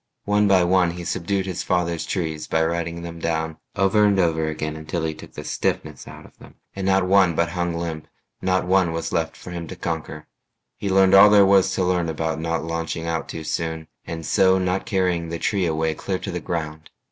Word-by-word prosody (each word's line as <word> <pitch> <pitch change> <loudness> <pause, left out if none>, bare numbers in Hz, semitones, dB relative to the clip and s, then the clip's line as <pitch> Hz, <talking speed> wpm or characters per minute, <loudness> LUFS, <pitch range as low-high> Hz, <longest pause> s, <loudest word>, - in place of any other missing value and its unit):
One 105 0 +3
by 95 -2 +5
one 90 0 +3
he 85 +1 -6
subdued 95 +4 -1
his 95 -3 -3
father's 85 -3 -1
trees 80 -5 -3
By 80 0 +1
riding 85 0 -3
them 85 -1 -7
down 80 -1 -2 0.2
over 100 +2 +3
and 100 -1 +4
over 80 -3 +1
again 75 0 -3
Until 80 +2 -4
he 80 -1 -1
took 75 - -13
the - - -7
stiffness - - -3
out - - -11
of - - -18
them, - - -15 0.2
And 95 -1 -3
not 95 -1 +3
one 95 -3 +4
but 85 +1 +1
hung 85 -1 -2
limp, 85 -2 -4 0.3
not 95 0 +1
one 90 -2 +2
was 80 0 -3
left 80 -1 -1
For 90 - -10
him 85 -1 -5
to 95 - -7
conquer. 80 -3 -5 0.5
He 100 - -4
learned 95 0 +4
all 100 +2 +9
there 100 -1 +6
was 95 -1 +4
To 95 - +1
learn 90 -2 +1
about 80 0 -2
not 80 0 -2
launching 80 0 -3
out 80 -1 -3
too 80 - -6
soon 80 0 -3 0.2
And 80 -1 -5
so 95 +3 +4
not 95 0 -1
carrying 90 -4 0
the 85 - -3
tree 95 0 0
away 80 0 0
Clear 95 +4 -3
to - - -6
the 90 - -3
ground. 80 -2 -5
85 Hz, 215 wpm, -23 LUFS, 80-95 Hz, 0.5 s, all